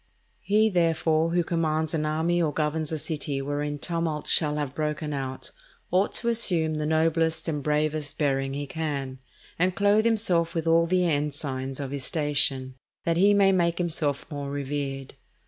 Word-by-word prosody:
He 215 +2 +3
therefore 165 -2 +2
who 175 +1 +1
commands 160 -1 -1
an 155 -1 0
army 165 +3 +1
or 155 -3 +1
governs 155 +1 -1
a 160 - -1
city 145 -2 -3
wherein 145 +1 -3
tumult 165 -1 -2
shall 150 -2 +2
have 145 -3 -3
broken 150 0 -2
out, 130 -2 -4 0.4
ought 190 +3 +2
to 235 - +1
assume 175 -9 +3
the 150 0 -2
noblest 160 +1 +1
and 150 -3 -2
bravest 150 0 -1
bearing 135 -2 0
he 145 0 -3
can, 140 -3 -4 0.4
and 180 +1 +2
clothe 205 +2 +3
himself 185 -8 +1
with 165 -1 -1
all 165 +1 +4
the 180 +1 +2
ensigns 140 -3 -2
of 135 -2 -4
his 140 -2 -3
station, 145 -4 +1 0.3
that 165 0 +1
he 200 +3 +5
may 195 -1 +5
make 170 -2 +1
himself 155 -5 -1
more 145 -1 -4
revered. 140 -1 -4
155 Hz, 165 wpm, -26 LUFS, 145-170 Hz, 0.4 s, he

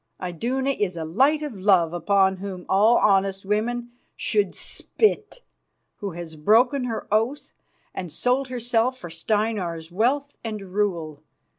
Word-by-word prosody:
Iduna 245 - -1
is 200 -9 -2
a 160 - -3
light 270 - +2
of 295 - -4
love 185 -4 +3
upon 190 +1 +2
whom 185 -2 -7
all 215 +5 +5
honest 195 -1 +2
women 240 +4 -1 0.2
should 415 - 0
spit, 435 +2 -1 0.5
who 200 -3 -5
has 165 -1 -8
broken 245 - +3
her 230 -2 -4
oath 225 +7 0 0.4
and 180 -4 -5
sold 255 - 0
herself 245 0 0
for 175 -8 -9
Steinar's 175 -3 -2
wealth 270 +9 0
and 210 -5 -6
rule. 170 -8 -1
210 Hz, 135 wpm, -24 LUFS, 180-245 Hz, 0.5 s, all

